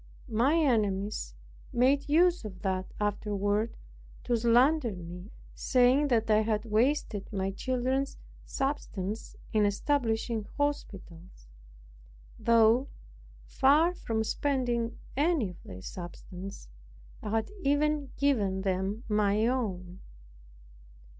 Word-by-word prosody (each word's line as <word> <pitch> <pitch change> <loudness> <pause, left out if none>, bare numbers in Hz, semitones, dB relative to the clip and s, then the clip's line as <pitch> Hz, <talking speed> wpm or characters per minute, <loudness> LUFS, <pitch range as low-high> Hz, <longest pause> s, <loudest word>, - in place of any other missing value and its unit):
My 245 +8 +3
enemies 210 - 0 0.4
made 275 +4 +2
use 345 +2 +4
of 190 -4 -9
that 185 -1 -2
afterward 205 +1 -1 0.5
to 245 - +1
slander 240 +4 +3
me, 180 +2 -9 0.2
saying 255 +3 +3
that 230 -4 +2
I 215 0 +5
had 215 0 -1
wasted 225 -2 0
my 195 -2 -1
children's 260 +5 -1 0.3
substance 220 -7 -3 0.2
in 215 -1 +3
establishing 225 0 0
hospitals, 190 - -4 0.9
though, 230 +3 +4 0.6
far 300 - +4
from 225 -10 -2
spending 240 -2 -1 0.2
any 295 - +2
of 175 - -15
their 90 0 -10
substance, 180 - -8 0.5
I - - -5
had 220 - -1
even 290 0 +1
given 205 -9 +1
them 195 +4 -1
my 210 0 +2
own. 190 -8 -2
225 Hz, 100 wpm, -29 LUFS, 200-270 Hz, 0.9 s, I